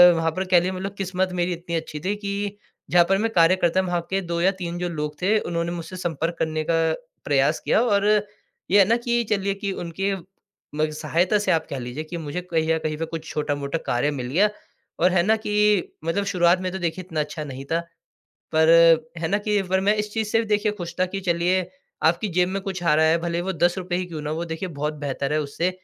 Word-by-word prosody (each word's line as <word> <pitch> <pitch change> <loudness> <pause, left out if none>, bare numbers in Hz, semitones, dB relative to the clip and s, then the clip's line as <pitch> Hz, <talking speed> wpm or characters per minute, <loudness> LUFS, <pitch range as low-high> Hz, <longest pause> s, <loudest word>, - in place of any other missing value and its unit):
वहाँ 165 0 +1
पर 185 +4 -3
कह 185 -1 +4
लीजिए 180 +2 -1
मतलब 190 +1 -4
किस्मत 185 -1 -1
मेरी 175 +1 +1
इतनी 170 0 -5
अच्छी 160 -2 -4
थी 190 +6 -1
कि 205 0 -4 0.3
जहाँ 175 -1 +6
पर 195 - +4
मैं 225 +3 0
कार्य 170 0 +5
करता 185 0 +2
था, - - -4
वहाँ 175 -1 0
के 195 0 0
2 170 -2 -3
या 190 +2 +4
3 170 0 -3
जो 175 0 -2
लोग 150 -2 -4
थे, 205 +4 +3
उन्होंने 170 -2 -2
मुझसे 175 +1 -6
संपर्क 170 -1 -2
करने 155 -1 -1
का - - +3 0.5
प्रयास 145 +2 +2
किया - - +3
और 205 -4 +2 0.7
ये 205 - +6
है 195 - +7
ना 230 - +4
कि 240 0 0
चलिए 200 -1 +1
कि 200 0 -3
उनके 195 +4 -2 0.6
म 155 +1 +1
सहायता 165 +6 +1
से 205 - +1
आप 160 - +1
कह 140 - -4
लीजिए 125 +5 -5
कि 170 +2 -6
मुझे 160 +2 -4
कहीं 165 -3 -1
ना 160 - +3
कहीं 155 -1 -3
पे 165 - -2
कुछ 160 0 -7
छोटा-मोटा 145 0 -2
कार्य 125 +5 +1
मिल 130 -4 -4
गया, 200 +8 +4 0.5
और 180 +2 +4
है 175 -1 +3
ना 220 +4 +4
कि 210 -2 +2 0.2
मतलब 200 +5 0
शुरुआत 180 -2 +3
में 185 0 -2
तो 190 - -4
देखिए 175 +1 -2
इतना 160 -3 -3
अच्छा 150 +1 -3
नहीं 135 -1 -7
था। 165 - +2 0.7
पर 160 0 +4 0.5
है 160 0 -2
ना 205 - +2
कि 210 0 +1
पर 190 0 0
मैं 205 +2 +3
इस 210 0 -3
चीज़ 220 -2 -1
से 225 +1 +2
देखिए 210 0 +1
खुश 175 -5 -7
था 185 - +4
कि 195 +2 -5
चलिए, 180 0 +1 0.3
आपकी 170 +6 +2
जेब 180 0 +2
में 195 +1 -2
कुछ 190 -2 -4
आ 170 -3 +3
रहा 160 +1 +4
है, 160 +1 +4
भले 170 0 -2
ही - - -1
वो 190 +2 -2
₹10 175 +1 0
ही 180 0 -2
क्यों 160 -4 -6
ना 150 - -3
हों। 155 - -2
वो 170 - -2
देखिए 165 +3 -4
बहुत 150 -1 -3
बेहतर 140 0 -2
है 155 - +2
उससे 150 +5 -1
175 Hz, 245 wpm, -24 LUFS, 160-195 Hz, 0.7 s, है